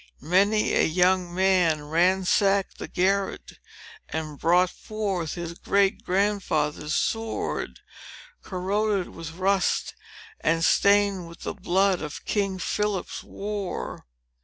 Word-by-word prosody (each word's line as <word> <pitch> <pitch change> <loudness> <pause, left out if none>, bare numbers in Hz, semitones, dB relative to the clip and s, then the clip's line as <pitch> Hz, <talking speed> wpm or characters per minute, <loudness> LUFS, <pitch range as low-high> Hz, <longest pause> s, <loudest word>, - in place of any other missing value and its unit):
Many 200 +7 +2
a - - +4
young 180 +1 +2
man 180 -4 +2
ransacked 185 +5 +2
the - - -5
garret, 195 +2 -1 0.5
and 155 -2 -5
brought 180 +2 +3
forth 195 -7 -3
his 170 -1 -5
great 195 +3 +1
grandfather's 180 -6 0
sword, 225 0 -2 0.6
corroded 195 +1 -1
with 165 -1 -8
rust, 190 +2 +1 0.5
and 165 +1 +1
stained 200 -3 +3
with 170 +1 -13
the - - -4
blood 190 -1 +1
of 150 -2 -7
King 195 -2 0
Philip's 210 0 -2
war. 200 - -5
185 Hz, 110 wpm, -25 LUFS, 170-200 Hz, 0.6 s, a